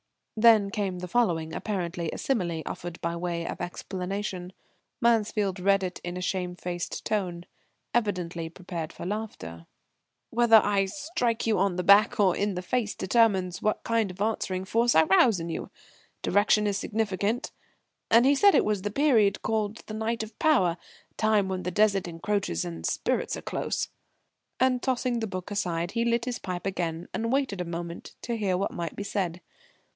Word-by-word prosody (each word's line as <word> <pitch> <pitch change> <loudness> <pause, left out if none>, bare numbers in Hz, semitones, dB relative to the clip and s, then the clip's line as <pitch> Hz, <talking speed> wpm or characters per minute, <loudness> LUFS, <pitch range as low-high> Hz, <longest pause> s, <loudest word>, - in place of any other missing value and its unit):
'" - - -49
Then 220 -4 +6
came 195 -4 -2
the 180 0 -5
following, 170 -8 +1
apparently 175 -5 -3
a - - -6
simile 175 -11 -1
offered 175 -1 -6
by 170 0 -2
way 170 -1 -3
of - - -5
explanation. 185 +1 -4 0.5
Mansfield 210 -4 +1
read 195 +1 +3
it 180 -1 -4
in 175 0 -4
a - - -4
shamefaced 180 -1 -3
tone, 180 -5 -2 0.5
evidently 180 -7 -1
prepared 170 -2 -6
for - - -8
laughter: 180 - -5 0.6
"'Whether 235 -1 +5
I 205 -2 +5
strike 245 - -2
you 220 -4 +2
on 195 -1 +2
the 180 - -1
back 205 +5 +6
or 190 -4 +4
in 205 -1 -1
the 180 - -4
face 220 +2 -1
determines 190 -4 +2
what 215 - 0
kind 230 -3 +1
of 180 +1 -10
answering 190 -3 -1
force 235 +4 +2
I 160 - +7
rouse 195 +4 +4
in 165 0 -4
you. 165 - -4 0.5
Direction 210 +2 +3
is 200 -1 0
significant.' 215 +4 -1 0.6
And 230 +2 +6
he 275 - +6
said 400 +8 +5
it - - +4
was 210 -2 0
the 205 - -2
period 225 -5 +3
called 215 -1 -1
the 215 - -7
Night 220 +1 -1
of 220 - -11
Power 190 - +3 0.4
time 215 -2 +3
when 190 -1 -2
the 180 - -2
Desert 200 -1 +2
encroaches 170 - -2
and 85 -1 -6
spirits - - -1
are - - -9
close." - - -2 0.7
And 255 -1 +3
tossing 250 -2 0
the 225 - -2
book 185 0 -6
aside, 175 -4 -1
he 230 0 0
lit 235 0 +1
his 250 -1 -3
pipe 180 -2 -5
again 175 -3 -2
and 230 +1 -1
waited 260 -9 0
a - - -3
moment 170 0 -6
to 235 - -2
hear 195 -5 0
what 195 - -1
might 170 -2 -5
be 205 - -4
said. 180 -4 -2
200 Hz, 180 wpm, -27 LUFS, 180-225 Hz, 0.7 s, I